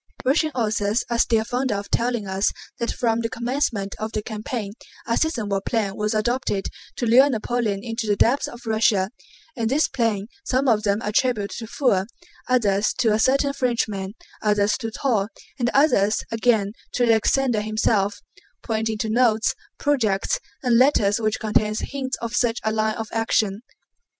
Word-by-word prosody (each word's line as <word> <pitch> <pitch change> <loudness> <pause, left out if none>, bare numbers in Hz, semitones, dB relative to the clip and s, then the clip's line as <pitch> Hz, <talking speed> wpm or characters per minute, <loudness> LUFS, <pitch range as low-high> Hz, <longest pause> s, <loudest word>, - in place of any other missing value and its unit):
Russian 310 +4 +3
authors 215 -1 0
are 235 - 0
still 225 -2 +3
fonder 250 -1 -1
of 200 0 -6
telling 235 -2 0
us 190 +1 0 0.3
that 235 - -1
from 230 -2 0
the 230 -1 -1
commencement 235 -5 -2
of 215 0 -3
the 215 - -2
campaign 215 -1 -5 0.3
a 230 - 0
Scythian 250 -9 0
war 195 -1 -1
plan 200 -3 -1
was 210 +1 -1
adopted 215 -2 -1 0.3
to 245 - -2
lure 255 +5 +6
Napoleon 225 -4 -1
into 225 -1 -3
the 205 - +2
depths 245 +7 +2
of 240 0 -11
Russia, 215 -3 +2 0.4
and 225 -2 -1
this 290 +5 +2
plan 225 -6 -1 0.2
some 270 -3 0
of 220 -4 +3
them 205 +1 0
attribute 210 -1 0
to 225 - -6
Pfuel, 205 -7 +1 0.4
others 210 -5 +2
to 230 -4 +2
a 215 - +1
certain 275 +4 +2
Frenchman, 215 -6 -1 0.3
others 210 -1 +2
to 225 -3 -3
Toll, 225 -4 0 0.3
and 240 -1 +1
others 220 -8 +3
again 220 -3 +2 0.2
to 245 - +2
Alexander 230 +1 +2
himself—pointing 220 +1 -2
to 220 - -2
notes, 235 +1 +3 0.2
projects, 225 -10 +1 0.2
and 240 -2 +4
letters 225 -6 +4
which 215 -1 0
contain 215 0 +1
hints 265 -2 -4
of 230 0 -3
such 240 -1 +1
a 220 - +1
line 215 0 0
of 225 -1 -5
action. 220 -2 0
225 Hz, 165 wpm, -23 LUFS, 210-245 Hz, 0.4 s, lure